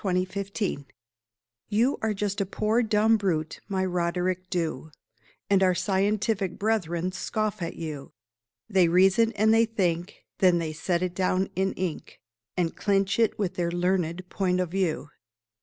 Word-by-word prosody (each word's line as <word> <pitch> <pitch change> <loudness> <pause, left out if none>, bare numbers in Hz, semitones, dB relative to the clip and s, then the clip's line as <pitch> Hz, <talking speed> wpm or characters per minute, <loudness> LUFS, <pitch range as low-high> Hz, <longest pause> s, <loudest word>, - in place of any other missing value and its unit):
RODERICK 190 +1 -1
DHU 180 -9 -2 0.8
You 230 +6 +2
are 220 -1 0
just 200 0 -1
a - - +1
poor 215 +4 +1
dumb 220 0 +3
brute, 165 -6 -1
my 190 -2 0
Roderick 180 +1 -1
Dhu, 160 -5 -2 0.6
And 195 -1 +3
our 185 -1 +4
scientific 200 0 0
brethren 185 -5 0
scoff 215 +1 -2
at 170 - -3
you. 150 -4 -6 0.6
They 190 -5 +4
"reason" 190 +6 +4
and 220 +1 +3
they 225 +1 +5
"think," 180 -5 -2
Then 180 -2 +5
they 160 -2 -2
set 170 +3 -1
it 180 -1 -2
down 185 +1 0
in 190 +1 0
ink, 180 -4 -5 0.4
And 170 -2 0
clinch 195 0 +1
it 225 - +2
with 190 -3 -1
their 175 -2 -1
learned 175 0 -1
"point 185 -2 0
of 180 -2 -1
view." 175 -6 -1
185 Hz, 155 wpm, -26 LUFS, 175-205 Hz, 0.8 s, they